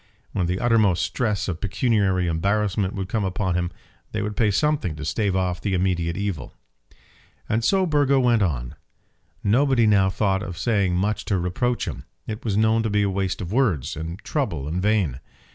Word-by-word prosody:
When 90 -4 -1
the 90 +2 -1
uttermost 110 -7 +3
stress 105 -6 -1
of 90 -2 -4
pecuniary 100 -3 +1
embarrassment 100 +3 0
would 95 -1 -3
come 110 +1 -1
upon 95 -1 -1
him, 90 0 0 0.4
they 110 0 -1
would 105 0 -3
pay 110 -3 +2
something 125 - +1
to 75 0 -6
stave 100 +4 0
off 90 -1 -1
the 100 -3 0
immediate 90 -2 0
evil. 100 -9 -4 0.9
And 110 +1 0
so 190 +5 +3
Burgo 145 -4 +3
went 120 -3 +3
on. 65 -10 -1 0.7
Nobody 120 +3 +3
now 100 -3 +4
thought 95 -1 0
of 90 -5 -6
saying 100 -6 +1
much 100 +4 0
to 100 - +1
reproach 95 +8 -1
him. - - -6 0.2
It 110 +1 -6
was 105 -3 0
known 110 +1 +3
to 110 - -1
be 105 0 +2
waste 95 -1 -1
of 90 0 -5
words, 95 - +1
and 80 +3 -5
trouble 85 - -2
in 85 +4 -2
vain. 95 - +1
100 Hz, 180 wpm, -23 LUFS, 90-110 Hz, 0.9 s, now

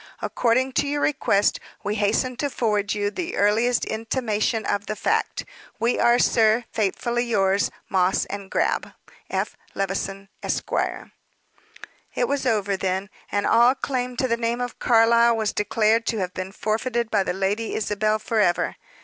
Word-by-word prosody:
According 255 +2 +1
to 285 - -3
your 290 0 -1
request, 205 -8 +2 0.2
we 205 - -1
hasten 215 +5 0
to 285 - -1
forward 210 -5 0
you 205 0 -1
the 345 +8 -4
earliest 225 +4 +2
intimation 225 -1 -1
of 205 +1 -1
the 215 - -2
fact. - - -1 0.3
"We 235 +2 +1
are, 240 0 +5
sir, 225 -1 +3
faithfully 235 +3 -1
yours, 200 -3 +2 0.2
"MOSS 185 0 +2 0.2
& 195 - -14
GRAB. - - 0 0.4
"F. - - -2 0.2
LEVISON, 195 0 -3
Esq." - - -3 1.4
It 245 - +1
was 275 -1 -1
over, 205 -4 +1
then, 190 +1 -2 0.2
and 205 0 0
all 240 +3 +5
claim 250 -2 -3
to 260 - +1
the 235 -1 0
name 235 +1 -1
of 245 -1 -4
Carlyle 235 0 +4
was 215 -1 -1
declared 220 +2 +1
to 225 - 0
have 185 -2 -2
been 185 +1 -5
forfeited 225 +3 -2
by 205 - +3
the 190 - -1
Lady 200 +4 -1
Isabel 215 0 0
forever. 215 -5 0
220 Hz, 155 wpm, -24 LUFS, 205-240 Hz, 1.4 s, are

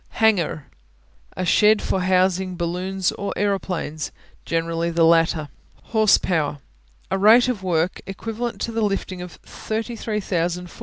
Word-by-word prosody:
Hangar 220 -4 +4
(hang'ar) 155 -2 -5 0.7
A 185 - -1
shed 210 +3 +5
for 190 - -1
housing 185 0 +1
balloons 180 +2 -1
or 200 - -4
aeroplanes, 185 -6 -2 0.3
generally 165 0 -1
the 170 0 +2
latter. 165 -2 +3 0.5
Horsepower 180 -9 +3 0.5
A 190 - 0
rate 225 +5 +6
of 245 -6 -2
work 175 -1 0
equivalent 225 +4 -4
to 230 - -2
the 225 0 -2
lifting 195 -3 -2
of 180 -1 -8
33,000 210 -6 -3
ft. - - -15
185 Hz, 135 wpm, -22 LUFS, 170-210 Hz, 0.7 s, rate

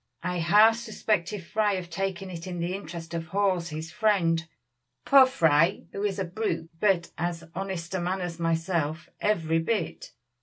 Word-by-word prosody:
"I 180 - -1
half 210 +7 +6
suspected 210 -4 -2
Fry 210 +3 +1
of 180 -2 -4
taking 190 +1 -3
it 170 0 -7
in 180 -1 -4
the 170 +2 -1
interest 170 -4 -7
of 165 -1 -3
Hawes, 185 -2 0
his 160 +1 -6
friend. 170 -6 +2 0.6
Poor 270 -2 +8
Fry, 165 - +3
who 200 - -5
is 205 -1 0
a 195 - -1
brute, 175 -3 -3
but 190 -4 +2
as 170 -1 -2
honest 190 -2 -4
a 190 - 0
man 185 +2 -1
as 175 -2 -5
myself, 165 -1 -1
every 165 -6 +1
bit. 230 - -2
175 Hz, 165 wpm, -27 LUFS, 165-200 Hz, 0.6 s, Poor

